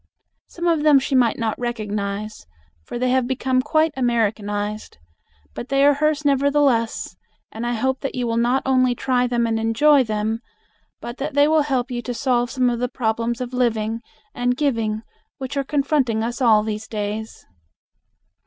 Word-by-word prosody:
Some 345 - -6
of 330 -3 +2
them 300 -2 +6
she 270 +1 -1
might 245 -3 +3
not 225 -2 -2
recognize, 215 - -4 0.4
for - - -6
they 250 +1 0
have 255 -1 +2
become 260 0 0
quite 310 +3 +1
Americanized, 215 - -1 0.6
but 240 - -7
they 275 0 +3
are 290 - +6
hers 300 +1 0
nevertheless, 275 -8 +1 0.4
and 230 +2 -4
I 240 - 0
hope 265 +3 -1
that 275 - -4
you 250 -1 -1
will 230 -1 -1
not 245 +3 +2
only 255 -2 +3
try 250 0 +1
them 240 -1 0
and 225 -1 0
enjoy 260 +6 +4
them, 220 0 -2 0.6
but 240 +1 -7
that 280 +1 -4
they 285 0 +5
will 315 0 +4
help 265 -3 -1
you 240 -1 -3
to 245 0 -5
solve 245 -2 +1
some 255 +1 +1
of 240 -1 0
the 250 0 -1
problems 235 0 -2
of 250 0 -5
living 230 -2 0 0.3
and 245 0 0
giving 225 -7 -1 0.3
which 265 +1 -6
are 275 - 0
confronting 275 -5 0
us 240 +3 -4
all 220 -4 +5
these 215 0 -4
days. 215 +1 -5
245 Hz, 175 wpm, -21 LUFS, 225-270 Hz, 0.6 s, them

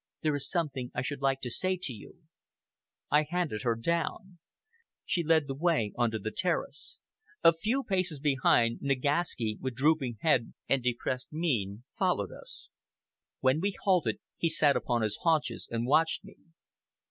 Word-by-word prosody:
"There 155 -1 +2
is 140 0 -2
something 145 -8 -2
I 125 - -1
should 140 +1 -4
like 135 -1 +1
to 125 - -4
say 185 +8 0
to 165 -8 -2
you." 110 +9 -13 0.9
I 150 - +6
handed 170 -11 -1
her 115 0 +1
down. 170 +7 -2 0.7
She 175 -2 0
led 160 -1 +3
the 135 - -4
way 145 -8 +1
on 120 -1 +2
to 110 - -2
the 110 +1 -4
terrace. 185 -1 -3 0.4
A 165 - +8
few 225 +11 -1
paces 185 - -1
behind, 130 -5 +3
Nagaski, 140 -4 0
with 130 -2 -3
drooping 135 -3 +2
head 130 -8 +2
and 135 - +2
depressed 125 +1 -2
mien, 120 - -1 0.2
followed - - +1
us. - - -9 0.7
When 130 +3 +3
we 200 +1 0
halted, 185 -4 +2 0.2
he 165 - +1
sat 150 -3 +3
upon 120 -2 0
his 105 -1 -2
haunches 160 -3 +1
and 115 0 -2
watched 155 +5 +2
me. - - -14
140 Hz, 160 wpm, -30 LUFS, 120-165 Hz, 0.9 s, A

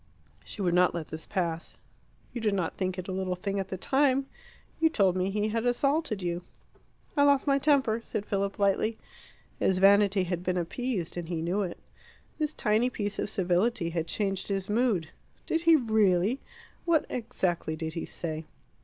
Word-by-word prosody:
She 205 - -6
would 175 -2 +2
not 180 0 +4
let 165 -3 -4
this 160 0 -7
pass. 170 -3 -2 0.6
"You 240 - -4
did 210 -2 +1
not 175 -4 -1
think 185 -1 -2
it 185 - -5
a - - -3
little 185 -1 -1
thing 195 +2 -3
at 190 - -3
the 190 - -5
time. 270 +4 +2 0.5
You 325 0 +4
told 195 - +2
me 185 +1 0
he 210 +2 0
had 225 +1 -1
assaulted 245 - +1
you." 175 0 -2 0.7
"I 285 - +3
lost 285 -1 +4
my 280 -1 +3
temper," 265 -6 +2
said 210 -2 -4
Philip 200 -1 -1
lightly. 205 +3 +1 0.6
His 190 - +2
vanity 200 0 +5
had 175 -1 -2
been 180 0 -1
appeased, 180 0 -2
and 170 -1 -5
he 165 -2 -2
knew 180 +5 0
it. 180 -3 -3 0.6
This 305 -1 0
tiny 220 +2 +2
piece 205 -4 -3
of - - -1
civility 185 0 +1
had 165 -1 -2
changed 195 -1 -1
his 195 0 -2
mood. 215 -8 +1 0.4
"Did 325 - 0
he 330 -1 +6
really 220 - +2 0.4
what 335 -3 +2
exactly 185 -9 -2
did 160 0 -4
he 165 - -4
say?" 160 -1 -5
195 Hz, 180 wpm, -28 LUFS, 180-235 Hz, 0.7 s, he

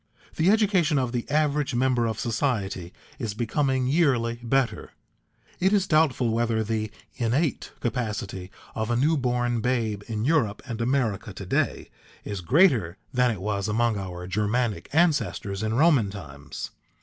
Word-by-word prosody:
The 160 +4 +3
education 195 -8 +3
of 125 -3 0
the 120 +1 -3
average 150 -2 +1
member 125 -2 +2
of 110 -1 -3
society 105 -8 -1 0.3
is 110 -6 -3
becoming 130 +3 0
yearly 125 -6 +2
better; 130 +1 0 0.7
it 190 +2 +3
is 200 -2 +3
doubtful 155 -8 +2
whether 115 -1 +1
the 110 0 -2 0.3
innate 130 +5 0
capacity 105 -6 -3 0.2
of 110 +1 -2
a 120 - +1
new 150 +7 +3
born 120 -3 0
babe 115 -4 0
in 110 0 -2
Europe 130 -9 +1
and 115 -3 -5
America 115 -5 0
to 95 +1 -8
day - - -1 0.3
is 100 -3 -5
greater 115 - +3 0.2
than 125 -1 +3
it 105 -6 -3
was 100 0 -1
among 115 +1 +1
our 90 -3 -5
Germanic 105 +4 -1
ancestors 150 - +1
in 110 +1 -1
Roman 140 -7 +4
times. 75 -8 -8
120 Hz, 150 wpm, -26 LUFS, 105-135 Hz, 0.7 s, Roman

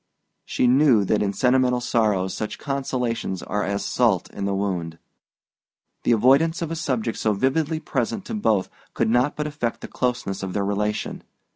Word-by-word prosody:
She - - 0
knew 125 -4 +5
that 105 - +1
in 100 -1 +1
sentimental 125 +2 +2
sorrows 105 -6 +1
such 110 - -4
consolations 125 - -2
are 105 +1 -2
as 100 +1 -2
salt 110 -8 +1
in 100 - -4
the 100 0 0
wound. 90 -5 -2 1.1
The - - +3
avoidance 140 +9 +4
of 165 - -4
a - - -2
subject 130 -8 -2
so 110 - +1
vividly 150 +8 0
present 145 - -2
to - - -6
both 110 - +1 0.3
could - - +1
not 125 +4 +2
but 150 - -2
affect 145 -6 -3
the - - -6
closeness 120 -6 -2
of 95 -1 -4
their 100 -1 0
relation. 105 +1 -2
120 Hz, 170 wpm, -23 LUFS, 100-135 Hz, 1.1 s, knew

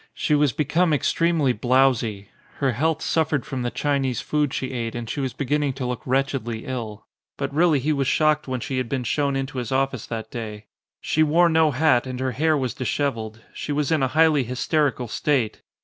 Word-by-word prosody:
She 150 - 0
was 145 -2 +3
be 150 - -1
come 170 +3 +2
extremely 155 -2 +2
blowsy. 120 -4 +1 0.3
Her 135 -2 +1
health 160 +6 0
suffered 155 -4 0
from 130 -2 -4
the 120 - -1
Chinese 135 -2 -1
food 150 -2 0
she 130 -1 -3
ate 115 -3 -3
and 120 -1 -5
she 125 - -4
was 135 -2 -1
beginning 140 +2 -1
to 130 -1 -4
look 125 -1 -3
wretchedly 130 -4 -1
ill. 115 -5 -5 0.3
But 140 0 -3
really 160 0 +4
he 150 +4 0
was 140 -2 0
shocked 155 0 +2
when 130 -2 -3
she 130 - -3
had 125 -2 -3
been 130 -2 -1
shown 140 +2 0
into 135 0 -3
his 120 -1 -5
office 135 -3 0
that 110 -1 -5
day. 110 -3 -6 0.4
She 155 - 0
wore 165 +3 +4
no 160 -1 +4
hat 135 -3 +2
and 130 -1 -5
her 130 0 -1
hair 155 +5 +2
was 130 -5 -2
dishevelled. 115 -4 -2
She - - -5
was 145 0 0
in 155 -3 +2
a 130 - +3
highly 160 -4 +5
hysterical 130 +1 0
state. 125 -1 0
135 Hz, 205 wpm, -23 LUFS, 125-150 Hz, 0.4 s, highly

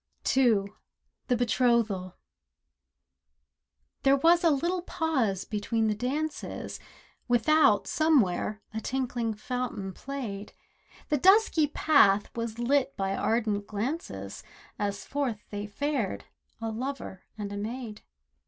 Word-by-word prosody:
THE 230 -7 +4 0.7
BETROTHAL 235 -5 +2
II 185 - -15 1.9
There 275 0 +5
was 335 +5 +4
a 335 - +6
little 340 +5 0
pause 285 - -1
between 220 +1 0
the - - +2
dances; 275 +8 -3 0.5
Without, 245 -3 +4
somewhere, 220 - +1
a 220 - -3
tinkling 245 -3 -2
fountain 215 -4 -4
played. 225 -7 -6 0.6
The 300 - +2
dusky 380 - +5
path 210 -10 +3
was 230 -1 -3
lit 270 +3 +1
by 195 0 -1
ardent 215 -3 0
glances 205 - -4 0.4
As 200 -1 -2
forth 260 -7 -2
they 205 0 -4
fared, 265 0 -2 0.3
a 225 -1 -3
lover 245 -5 -5 0.2
and 205 -1 -5
a - - -4
maid. 220 0 -5
235 Hz, 110 wpm, -28 LUFS, 210-280 Hz, 1.9 s, a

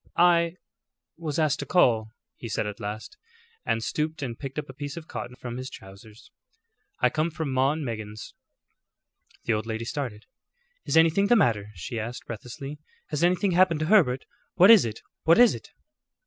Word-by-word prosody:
"I 170 -1 +4 0.6
was 160 -3 -4
asked 155 -2 +1
to - - -5
call," 115 -11 +3 0.3
he 115 - -8
said 110 - -1
at 105 -1 -6
last, 110 - -6 0.5
and 115 - -1
stooped 155 +2 -2
and 120 -3 -4
picked 135 -1 -7
a 150 - -1
piece 145 +2 -7
of 165 -1 -8
cotton 120 +1 -6
from 120 -1 -7
his 130 +1 -5
trousers. 105 +3 -14 0.7
"I - - +4
come 155 +2 0
from 155 -4 -4
'Maw 135 +2 +3
and 155 -2 -4
Meggins.'" 110 -2 -6 1.1
The 115 - +1
old 110 +1 -2
lady 110 0 -3
started. 120 -6 -5 0.6
"Is - - +1
anything 165 +5 +4
the 240 - +5
matter?" 110 - +2
she 85 +7 -5
asked, 115 +3 -6
breathlessly. 135 +6 -8 0.3
"Has 150 +1 -1
anything 180 +2 +2
happened 175 -3 +3
to - - +1
Herbert? 155 -9 +3 0.3
What 185 +4 +8
is 220 - +8
it? 110 -1 -6 0.2
What 165 +1 +5
is 245 0 +7
it?" - - -9
135 Hz, 175 wpm, -26 LUFS, 115-165 Hz, 1.1 s, What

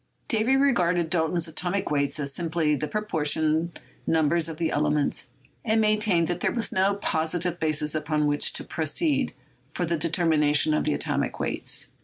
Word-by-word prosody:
Davy 230 +3 +2
regarded 180 - +2
Dalton's 170 0 0
atomic 175 +4 -2
weights 140 0 0
as 140 -1 -2
simply 165 -2 0
the 150 +1 -2
proportion 160 -4 0 0.4
numbers 160 +1 +2
of 160 - -7
the 165 -1 -1
elements, 145 -3 0 0.3
and 220 -1 +1
maintained 210 -5 +2
that 175 +1 -3
there - - 0
was 235 -2 -2
no 195 +2 +2
positive 175 -1 -2
basis 150 -1 0
upon 155 -1 -1
which 145 0 +2
to - - -4
proceed 270 - 0 0.4
for 175 - -1
the 170 0 -1
determination 155 -2 +2
of 155 - 0
the 150 - +1
atomic - - -1
weights. - - -2
165 Hz, 160 wpm, -25 LUFS, 150-180 Hz, 0.4 s, Davy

